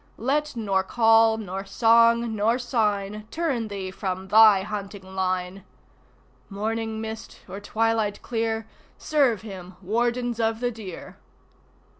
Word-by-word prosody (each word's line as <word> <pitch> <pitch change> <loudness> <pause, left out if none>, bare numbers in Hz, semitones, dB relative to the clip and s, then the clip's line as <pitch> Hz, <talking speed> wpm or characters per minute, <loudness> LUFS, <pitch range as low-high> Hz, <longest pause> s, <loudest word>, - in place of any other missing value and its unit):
Let 290 +4 -1
nor 200 -4 0
call 225 +2 +4
nor 195 -3 -5
song 230 +2 +3
nor 220 +3 +2
sign 215 -4 -1
Turn 280 -9 -2
thee 195 -2 -5
from 190 0 -5
thy 215 -3 +7
hunting 200 -2 -7
line. 185 0 -2 0.9
(Morning 220 +2 -3
mist 220 0 -7
or 195 - -7
twilight 220 0 0
clear, 225 -1 -2 0.3
Serve 265 -9 +1
him, 185 -4 -9
Wardens 240 +4 -1
of 225 0 0
the 245 0 -1
Deer!) 210 -6 -9
220 Hz, 120 wpm, -25 LUFS, 195-230 Hz, 0.9 s, thy